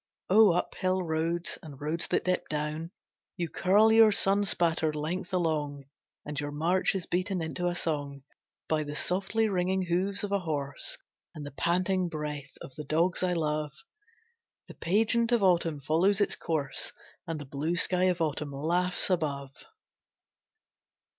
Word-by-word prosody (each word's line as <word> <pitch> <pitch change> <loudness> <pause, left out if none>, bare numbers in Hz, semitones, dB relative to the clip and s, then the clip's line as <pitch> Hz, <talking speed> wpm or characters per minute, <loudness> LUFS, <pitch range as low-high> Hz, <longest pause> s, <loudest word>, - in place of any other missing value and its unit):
O 210 -2 +7
Uphill 185 +1 -1
roads 165 +1 -1
and 145 -4 -11
roads 155 +3 -1
that - - 0
dip 185 0 -1
down! 150 +2 -3 0.5
You 170 -2 -2
curl 210 +4 +4
your 220 -1 +7
sun 200 0 +3
spattered 165 -4 +1
length 170 +5 -4
along, 155 -5 -1 0.4
And 150 0 -4
your 145 0 -3
march 170 +7 +1
is 185 -3 -3
beaten 185 +1 -1
into 170 +2 -2
a 175 - -1
song 145 -5 -3 0.4
By 155 -1 +1
the 145 -1 -5
softly 195 +7 0
ringing 190 -1 0
hoofs 185 +4 0
of 205 - -3
a 200 - +2
horse 145 -5 -2 0.4
And 150 -2 -7
the 145 - -7
panting 180 +4 0
breath 150 -3 -6
of 135 - -10
the 150 - -7
dogs 165 +5 +1
I 180 -1 +1
love. 150 -3 -1 0.9
The - - -10
pageant 225 +6 +1
of 235 -4 +3
Autumn 170 -5 +2
follows 170 +8 +2
its 205 - +2
course 150 -5 -2 0.4
And 165 -2 -3
the 145 - -7
blue 145 +5 -2
sky 180 +1 +4
of 180 -2 +1
Autumn 150 -2 -2
laughs 175 +6 +1
above. 140 -6 -1
170 Hz, 155 wpm, -29 LUFS, 150-185 Hz, 0.9 s, O